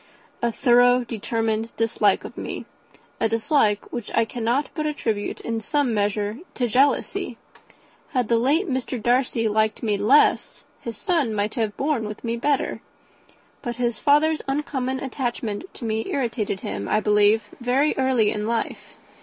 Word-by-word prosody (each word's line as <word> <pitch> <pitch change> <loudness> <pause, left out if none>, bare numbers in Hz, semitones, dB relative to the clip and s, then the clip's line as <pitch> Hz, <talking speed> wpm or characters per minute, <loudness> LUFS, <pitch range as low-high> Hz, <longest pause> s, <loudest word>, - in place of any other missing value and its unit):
"A 235 - +1
thorough, 245 +1 +4
determined 225 -1 -2
dislike 220 -3 +2
of - - -9
me - - -5 0.5
a 225 - +2
dislike 225 -2 +1
which 240 -3 -4
I - - +4
cannot 240 +5 -1
but 305 -2 -2
attribute 225 -9 -2
in 230 -1 -3
some 275 +2 0
measure 205 +2 -1 0.2
to 250 - 0
jealousy. 265 +6 +1 0.7
Had 250 -6 0
the 230 0 +3
late 300 - +2
Mr. 260 -2 -2
Darcy 240 0 +1
liked 215 +1 +1
me 210 -3 +1
less, 255 +9 +3 0.2
his 230 -3 -6
son 290 -10 0
might 205 +1 -1
have 220 -5 -2
borne 275 -7 0
with 210 0 -8
me 230 -1 -1
better; 275 +4 0 0.8
but 240 -1 -4
his 235 -2 -1
father's 305 +2 +3
uncommon 270 -2 -2
attachment 245 - -3
to 240 - -7
me 220 0 -1
irritated 230 -7 -2
him, 100 0 -4
I 215 - +3
believe, 210 +1 +3 0.2
very 260 +5 +2
early 260 -5 +2
in 210 0 -2
life. 230 0 -3
235 Hz, 155 wpm, -23 LUFS, 215-265 Hz, 0.8 s, thorough